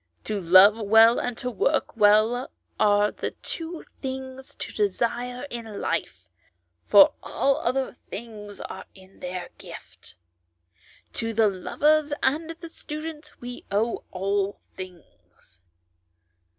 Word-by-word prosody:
To 210 -2 -3
love 190 +5 +7
well 225 +2 +6
and 245 -1 -3
to 250 -1 -3
work 275 +6 0
well 220 +4 +4 0.3
are 205 0 +4
the - - -5
two 330 0 -5 0.2
things 265 0 -6
to - - -6
desire 235 +5 -1
in 225 -3 -6
life, 95 -3 -3 0.6
for 200 -1 +8
all 275 0 +1
other 260 +2 -1 0.2
things 210 -2 -8
are 190 - -7
in 190 0 -17
their 180 0 -5
gift. - - -11 1.0
To 225 0 -2
the 220 -1 +4
lovers 295 +10 +1
and 305 +5 +1
the 335 +1 -8
students 305 -1 -8
we 245 0 -7
owe 220 +4 0
all 195 +1 -1 0.2
things." 175 - -13
225 Hz, 120 wpm, -25 LUFS, 200-265 Hz, 1.0 s, for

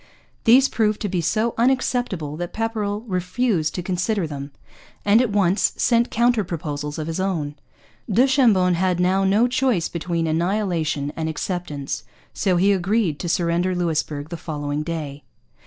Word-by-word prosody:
These 255 +4 +6
proved 215 -4 0
to 205 - -1
be 180 -2 -1
so 215 +7 0
unacceptable 240 - 0
that 175 0 -5
Pepperrell 215 -2 -2
refused 185 -3 -1
to 180 - -3
consider 185 +2 -1
them, 140 -2 -6 0.6
and 210 +3 +5
at 250 - +1
once 200 -1 +2
sent 235 0 +2
counter 235 -1 +2
proposals 150 -4 -4
of 155 - -3
his 165 +2 -3
own. 170 -7 -1 0.6
Du 235 +7 +5
Chambon 225 -10 +4
had 180 0 +1
now 185 +2 +2
no 205 +5 +3
choice 250 -8 +1
between 170 0 -2
annihilation 165 -4 -1
and 160 -1 -2
acceptance, 160 -4 -4 0.3
so 185 -4 +1
he 195 +3 +4
agreed 195 -4 +1
to 175 - -3
surrender 175 +2 +1
Louisbourg 155 -4 -2
the 170 - -5
following 145 -2 -3
day. 150 -3 -5
180 Hz, 155 wpm, -22 LUFS, 160-215 Hz, 0.6 s, These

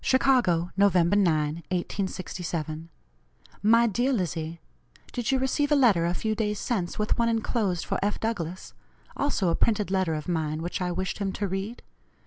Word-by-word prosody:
"CHICAGO, 245 -11 +3
Nov. 200 -1 +4
9, 175 -2 +5
1867. 170 -1 -1 0.7
"MY 230 +3 +5
DEAR 240 +5 +1
LIZZIE: 170 - -2 0.5
Did 245 -3 -2
you 265 - +3
receive 275 +3 0
a - - +6
letter 210 -12 +4
a 175 - -1
few 220 +3 -1
days 210 -1 -1
since, 190 -8 -2
with 210 +2 0
one 230 0 +3
enclosed 220 -5 0
for - - -1
F. 205 +1 0
Douglass? 185 -6 -4 0.4
also 250 -10 0
a 165 - +2
printed 210 -4 +1
letter 185 -4 +1
of 150 -1 -5
mine, 160 -2 -1
which 175 +2 -3
I 180 -1 0
wished 190 +3 -3
him 195 -2 -1
to 205 - -2
read? 195 +5 -4
195 Hz, 165 wpm, -27 LUFS, 170-225 Hz, 0.7 s, a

